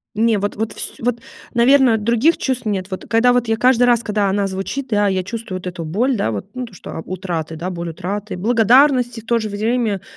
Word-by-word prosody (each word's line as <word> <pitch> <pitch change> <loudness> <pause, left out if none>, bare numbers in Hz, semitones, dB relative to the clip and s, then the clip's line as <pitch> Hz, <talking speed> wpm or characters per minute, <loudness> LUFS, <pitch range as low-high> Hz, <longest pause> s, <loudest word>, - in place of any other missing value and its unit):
Не, 225 0 +2
вот 205 +1 -2
вот 220 +1 -3
вс - - -4
вот, 235 0 -1 0.4
наверно, 250 -1 +5
других 235 +9 +2
чувств 255 -2 -2
нет. 195 -2 -2
Вот 185 - -5
когда 230 +2 +4
я - - +5
вот 245 -1 +1
каждый 250 +1 +4
раз, 240 -1 +3
когда 210 -2 0
она 200 +1 0
звучит, 195 +8 -4
да, 205 -2 +2
я 190 -1 0
чувствую 220 -1 -5
вот 185 - -10
эту 175 -2 -5
боль, 235 +12 0
да, 200 - 0
вот, 100 -2 -4
ну, 255 0 -4
то 225 - -16
что, 180 - -10
а, - - -5
утраты, 175 -4 -4
да, 170 +4 -4
боль 170 -1 -5
утраты, 190 +4 -5
благодарности 245 +3 +3
и - - -13
в - - -25
то 235 0 +1
же 215 -1 -4
время. 215 -1 -1
220 Hz, 235 wpm, -19 LUFS, 190-240 Hz, 0.4 s, наверно